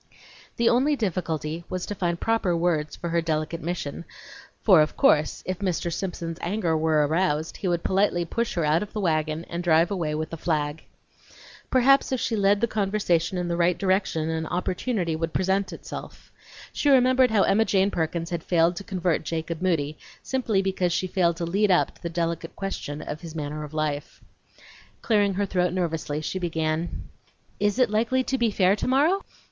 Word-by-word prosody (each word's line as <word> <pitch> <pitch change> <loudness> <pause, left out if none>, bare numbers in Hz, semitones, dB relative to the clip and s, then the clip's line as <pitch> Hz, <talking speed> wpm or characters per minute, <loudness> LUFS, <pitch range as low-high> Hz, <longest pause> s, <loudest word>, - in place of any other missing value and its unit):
The 235 - +2
only 270 +6 +3
difficulty 170 - -2
was 185 -1 -3
to - - -4
find 175 -3 -2
proper 220 -6 +1
words 165 -3 0
for 170 - -5
her 170 0 +1
delicate 160 +1 -2
mission, 170 -3 -4 0.6
for, 185 -7 +7
of 155 - -1
course, 150 0 +3
if 185 -1 -3
Mr. 175 -3 -1
Simpson's 170 -2 -4
anger 175 -3 0
were 155 -1 +2
aroused, 160 0 0
he 195 - -3
would 175 -1 0
politely 190 -3 +1
push 230 +7 -2
her 170 -3 +1
out 155 +2 +3
of 210 - -6
the 215 - -3
wagon 155 -3 0
and 170 +1 -4
drive 165 +1 +3
away 165 -6 -1
with 155 +1 -3
the 165 - -5
flag. 150 -1 -1 0.9
Perhaps 270 +2 +4
if 260 - 0
she 230 - -1
led 200 0 +3
the 235 - +3
conversation 195 -4 0
in 180 -1 -2
the 170 - -1
right 175 0 +2
direction 190 -5 0
an 160 0 -2
opportunity 180 0 -1
would 165 0 -3
present 190 0 0
itself. 165 - -9 0.4
She 290 - +1
well 275 - +8
remembered 255 0 +4
how 215 -3 +3
Emma 220 +3 +3
Jane 195 -1 +2
Perkins 165 +1 -2
had 170 -1 -2
failed 170 0 +2
to 200 - -5
convert 185 -5 -1
Jacob 165 +1 -4
Moody, 155 -5 0 0.2
simply 230 -7 0
because 185 -2 0
she 170 +2 0
failed 175 -2 +1
to 170 - -2
"lead 200 +5 +1
up" 180 - +3
to - - -24
the 170 - -3
delicate 165 0 -3
question 155 -6 -5
of 150 - -6
his 165 -2 -9
manner 150 0 -4
of 150 - -8
life. 150 -2 -3 0.8
Clearing 205 -3 +2
her 200 +1 0
throat 180 -2 0
nervously, 160 -4 -2
she 185 +4 -3
began: 160 -1 -2 0.6
"Is 205 +2 +1
it 250 -5 +3
likely 235 +4 +1
to 265 0 -2
be 235 -1 +3
fair 195 -1 +3
tomorrow?" 290 - +2
175 Hz, 190 wpm, -25 LUFS, 160-200 Hz, 0.9 s, well